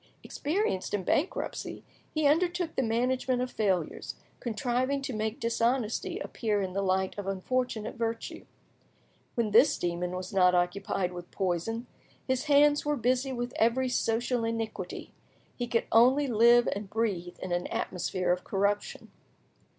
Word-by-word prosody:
Experienced 295 - -1
in 195 - -3
bankruptcy, 375 - -2 0.3
he 310 -1 0
undertook 345 +3 +2
the - - +2
management 250 +2 +1
of 250 0 -2
failures, 190 -7 -1 0.2
contriving 245 +4 -1
to 270 -1 -4
make 215 +1 -2
dishonesty 230 0 0
appear 215 -3 -1
in 190 -2 -2
the 195 - 0
light 190 0 0
of 200 - -5
unfortunate 220 +3 -2
virtue. 230 0 -3 0.9
When 230 -3 0
this 240 +8 +6
demon 175 +1 -2
was 185 +1 -6
not 180 -2 +5
occupied 180 +1 0
with 175 0 -8
poison, 195 +5 -2 0.4
his 260 +2 0
hands 290 0 +5
were 295 0 +1
busy 255 +3 +1
with 245 -1 -3
every 250 +3 +2
social 240 0 0
iniquity; 225 -5 -4 0.4
he 245 - -3
could 235 -1 +1
only 255 +5 +5
live 240 0 +5
and 200 0 -6
breathe 190 -6 -2
in 185 - -6
an 175 0 0
atmosphere 180 0 -1
of 180 0 0
corruption. 200 +1 -1
230 Hz, 145 wpm, -29 LUFS, 190-255 Hz, 0.9 s, this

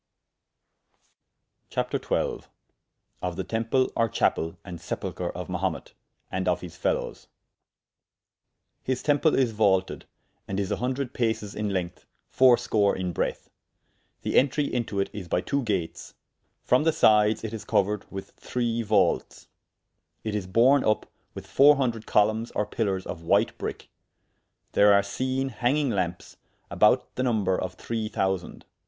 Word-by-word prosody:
CHAPTER - - -1
XII.Of 90 -1 -5
the 95 - -3
Temple 115 +5 0
or 115 0 +2
Chapell, 80 -4 0
and 90 -4 -8
Sepulchre - - -4
of - - -6
Mahumet, - - -3 0.4
and 95 0 -2
of 90 - +1
his 85 -3 -9
Felowes. - - -2 1.5
His 130 -1 -2
temple 150 +1 +3
is 130 -4 +2
vaulted, 100 -3 +1 0.4
and 100 0 -2
is 100 0 -2
a - - 0
hundred 130 +1 -2
pases 110 -3 -1
in 105 -1 -2
length, 90 -3 -4 0.2
fourscore 120 -5 +4
in 90 -1 -2
breadth; - - -3 0.7
the - - +4
entry 140 +2 +1
into 120 -7 -2
it 100 - -1
is 100 -4 -7
by 85 - +1
two 140 +7 -1
gates; 100 -9 -3 0.5
from 125 +4 +3
the 160 - +3
sydes 105 -2 +4
it 110 0 -5
is 110 - -6
couered 105 +1 +1
with 95 0 -7
three 120 -2 -2
vaultes; 105 -2 +1 0.8
it 110 - -3
is 100 -3 -3
borne 125 +8 +4
vp 110 - +1 0.3
with - - -8
four 145 +2 +6
hundred 120 -5 -2
columnes 110 +2 +2
or 105 - +1
pillers 100 -5 -2
of 80 - -6
white 85 - +2
brick; - - -6 0.8
there 105 0 +5
are 100 - +4
seene, 130 +6 -2
hanging 130 +4 0
lampes, 90 -4 -3 0.3
about - - +3
the - - 0
number 110 -7 +1
of 90 -1 -4
three 110 -2 -4
thousande. 95 -3 -2
110 Hz, 145 wpm, -26 LUFS, 95-125 Hz, 1.5 s, four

